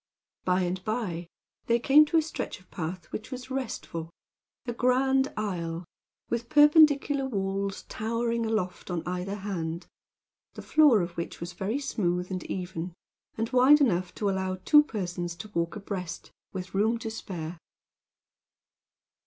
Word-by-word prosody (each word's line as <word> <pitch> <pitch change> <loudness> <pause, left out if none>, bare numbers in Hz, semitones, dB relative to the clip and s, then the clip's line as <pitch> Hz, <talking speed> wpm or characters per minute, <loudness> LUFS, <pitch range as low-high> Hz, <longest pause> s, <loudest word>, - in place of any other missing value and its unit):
By 185 0 +3
and 180 +1 -2
by 190 -7 -2 0.4
they 235 - +4
came 280 +5 +6
to 325 - +1
a 320 - +4
stretch 320 - -5
of 185 - -24
path 175 +2 -4
which 215 - -5
was 255 0 -7
restful 220 -10 -4 0.6
a 240 - -2
grand 265 +2 +2
aisle, 175 -5 -3 0.4
with 235 0 -3
perpendicular 295 -2 +5
walls 195 -3 -2
towering 230 +1 -1
aloft 215 -6 -2
on 175 -2 -2
either 180 +2 -2
hand; 175 -4 -4 0.7
the - - -8
floor 295 -9 +5
of 170 - -4
which 170 - -4
was 170 +1 -6
very 200 +8 -2
smooth 180 -10 -1
and 185 -1 -3
even, 180 -2 -4 0.4
and 225 +2 -2
wide 260 +4 +7
enough 185 -10 +2
to 205 - -1
allow 190 -1 0
two 295 -1 +8
persons 175 -9 -4
to 215 +5 -9
walk 170 -2 -1
abreast, 190 -4 -5 0.2
with 185 -1 -6
room 220 +4 +2
to 225 -1 -5
spare. 175 -6 -6
200 Hz, 145 wpm, -28 LUFS, 180-245 Hz, 0.7 s, two